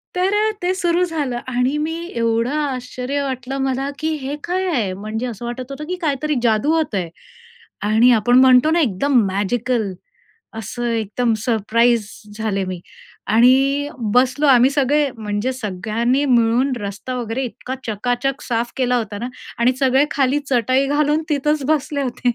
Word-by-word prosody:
तर 370 +2 +1
अ, 430 +1 +2
ते 365 +1 +1
सुरू 350 -1 +1
झालं 295 -8 -2
आणि 255 +3 0
मी 315 +2 -2 0.2
एवढं 230 +2 +1
आश्चर्य 260 0 -3
वाटलं 265 0 -4
मला 265 +2 -1
की 315 0 -1
हे 275 +2 -3
काय 370 +2 -1
आहे! 220 - 0
म्हणजे 215 +5 -4
असं 235 0 -7
वाटत 250 +2 -6
होतं 275 +2 -6
की 365 - -1
काहीतरी 300 -1 0
जादू 225 +6 +2
होत 315 -10 -1
आहे 175 -3 -2 0.8
आणि 225 +4 +5
आपण 245 +3 +4
म्हणतो 260 +4 +6
ना, 340 - +3
एकदम 255 +2 +2
मॅजिकल, 210 +2 -1 0.7
असं 235 +3 -6
एकदम 225 +2 0
सरप्राईज 230 -1 +2 0.3
झाले 205 -3 -1
मी. 185 -1 -5 0.5
आणि 270 +5 +4 0.2
बसलो 260 +4 +3
आम्ही 255 -1 +6
सगळे, 285 +1 +2
म्हणजे 210 +3 -2
सगळ्यांनी 230 +4 -1
मिळून 245 +1 +3
रस्ता 205 +5 -5
वगैरे 240 +2 -3
इतका 250 +2 -6
चकाचक 245 +5 -2
साफ 235 0 -2
केला 250 -1 +1
होता 215 -3 -4
ना 240 - -3 0.3
आणि 240 +2 +4
सगळे 265 0 +4
खाली 275 0 +1
चटई 255 +2 +2
घालून 295 +2 +1
तिथंच 300 0 0
बसले 295 -1 0
होते. 250 -1 -1
250 Hz, 155 wpm, -20 LUFS, 230-280 Hz, 0.8 s, म्हणतो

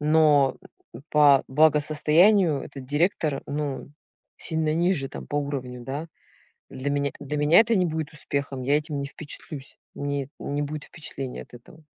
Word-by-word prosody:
но 150 -3 +4 0.5
по 145 -2 +6
благосостоянию 155 +4 +4
этот 135 -2 -9
директор, 150 -1 0
ну, 145 -1 -4 0.5
сильно 160 -2 -1
ниже 170 -5 +1
там - - -8
по 145 - -3
уровню, 130 -4 -3
да. 145 +5 -4 0.6
Для 135 +2 -4
меня 140 0 0
для 145 +1 -4
меня 150 +7 +6
это 230 0 +3
не 180 -3 +3
будет 160 -2 -3
успехом, 140 -3 -3
я 140 +3 +3
этим 150 -1 -3
не 140 - -3
впечатлюсь, 145 -1 -7 0.2
мне 140 -1 -3
не 145 +1 -3
будет 150 0 -5
впечатлений 140 -4 -6
от - - -17
этого. 125 +6 -15
145 Hz, 150 wpm, -25 LUFS, 140-155 Hz, 0.6 s, по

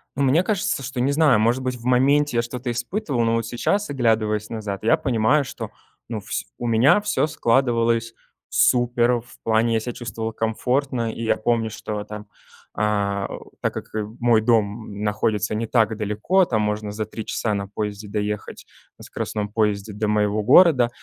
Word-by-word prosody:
Ну 140 - 0
мне 145 +7 +3
кажется, 205 -7 -1
что, 125 0 -5
не 135 +3 +2
знаю, 145 -6 +4
может 120 +4 +2
быть, 130 0 -2
в 120 0 -12
моменте 135 +1 +3
я - - +4
что-то 120 +1 -4
испытывал, 120 - -2
но 115 0 +2
вот 115 - -1
сейчас, 200 - -1
оглядываясь 110 -5 0
назад, 105 -3 -5
я 115 - +4
понимаю, 130 +4 +2
что - - -7 0.4
ну 115 -2 -4
вс 105 - -4
у 120 - -4
меня 120 - +5
всё 205 -6 0
складывалось 115 -4 +1 0.4
супер. 120 -1 +3
В 120 - -17
плане, 115 +1 +2
я 110 - +2
себя 120 +2 -5
чувствовал 110 -1 -5
комфортно, 120 +2 -1
и 115 - -6
я 110 -1 +1
помню, 115 0 0
что, 105 0 -5
там, 105 0 -8 0.5
э, - - -1
э, 100 -2 0 0.3
так - - -1
как - - -6 0.3
мой 120 -2 +4
дом 110 -2 0
находится 105 0 0
не 110 +1 -2
так 110 -2 +2
далеко, 110 - +1
там 110 -8 0
можно 105 0 -2
за 105 +1 -3
3 110 +1 -7
часа 110 - -1
на 100 -1 -3
поезде 105 0 -5
доехать, 105 0 -4 0.3
на - - -13
скоростном 105 -1 -4
поезде 105 -1 -1
до 105 +1 -2
моего 105 0 +1
города. 130 - +6
115 Hz, 180 wpm, -22 LUFS, 105-125 Hz, 0.5 s, города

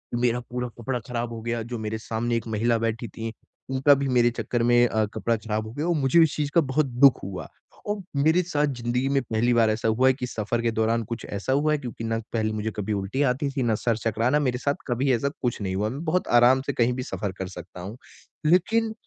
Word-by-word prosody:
मेरा 120 0 +1
पूरा 125 0 -2
कपड़ा 125 +1 -2
खराब 120 -1 -3
हो 115 - -6
गया, 115 +1 -2
जो 120 +1 -5
मेरे 110 0 -3
सामने 115 +1 -2
1 115 - -5
महिला 115 +2 +1
बैठी 115 +1 -2
थी, 115 +1 -6 0.4
उनका 135 +2 +5
भी 140 - 0
मेरे 120 -2 +4
चक्कर 115 +1 -2
में 120 0 +5
अ, 110 -2 +1
कपड़ा 115 +1 0
खराब 110 0 -3
हो - - -8
गया 150 +6 -2
और 175 - +2
मुझे 145 +2 +3
उस 160 - 0
चीज़ 145 -1 -2
का 170 - +7
बहुत 145 +1 +1
दुःख 130 +1 +5
हुआ। 95 -1 -6 0.4
और 205 +1 -1 0.2
मेरे 160 +5 +3
साथ 150 -4 0
ज़िंदगी 125 -1 -1
में 140 0 +2
पहली 120 0 +1
बार 115 -2 +4
ऐसा 110 +1 0
हुआ 115 +4 +3
है 130 - +5
कि 130 -1 -4
सफ़र 115 0 -2
के 115 -1 +1
दौरान 110 +1 +1
कुछ 115 -1 -5
ऐसा 100 +6 -2
हुआ 150 +3 +2
है, 150 - +2
क्योंकि 120 -4 -7
ना 115 0 -1 0.2
पहले 110 -2 0
मुझे 110 +1 -2
कभी 105 +1 -2
उल्टी 100 +7 -2
आती 140 +3 -2
थी, 135 -2 -1
ना 115 -2 +2
सर 115 +1 0
चकराना, 115 +5 +1
मेरे 130 -4 0
साथ 140 +2 0
कभी 130 +2 +1
ऐसा 125 +4 +1
कुछ 120 -2 -1
नहीं 95 -2 -2
हुआ, 105 +3 0
मैं 140 +7 -5
बहुत 175 +3 0
आराम 130 +2 +5
से 140 - -1
कहीं 120 0 +2
भी 130 +1 -3
सफ़र 100 -6 -4
कर 95 - -3
सकता 90 -1 -10
हूँ। 100 +6 -7 0.5
लेकिन 220 +7 +3
120 Hz, 245 wpm, -25 LUFS, 110-135 Hz, 0.5 s, का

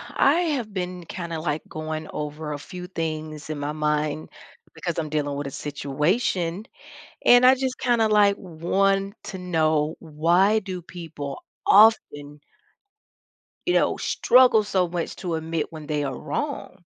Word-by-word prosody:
I 330 +4 +3
have 225 -6 -5
been 180 -1 -4
kinda, 170 -1 -5
like, 155 -1 -2
goin' 155 0 -5
over 150 0 -4
a - - -4
few 180 +4 -8
things 155 -3 -5
in 155 - -3
my 145 +1 -2
mind 150 0 -1 0.5
because 170 -2 -4
I'm 155 -2 -3
dealin' 145 -1 -1
with 145 0 -4
a - - -6
situation. 165 - -1 0.6
And 245 +1 +7
I 260 +1 +8
just 260 -1 -2
kinda, 235 -3 +2
like, 205 -1 +5
want 195 +3 0
to 190 - -6
know 160 -3 +1
why 170 +7 +2
do 190 -3 -6
people 160 -5 -7 0.3
often 150 -9 +4 1.3
you 355 - +3
know, - - +2
struggle 250 -4 +4
so 190 -3 +1
much 170 0 -4
to 175 -3 -3
admit 160 0 -3
when 155 -2 -9
they 150 -1 -1
are 135 -2 -4
wrong? - - -5
165 Hz, 150 wpm, -24 LUFS, 150-195 Hz, 1.3 s, I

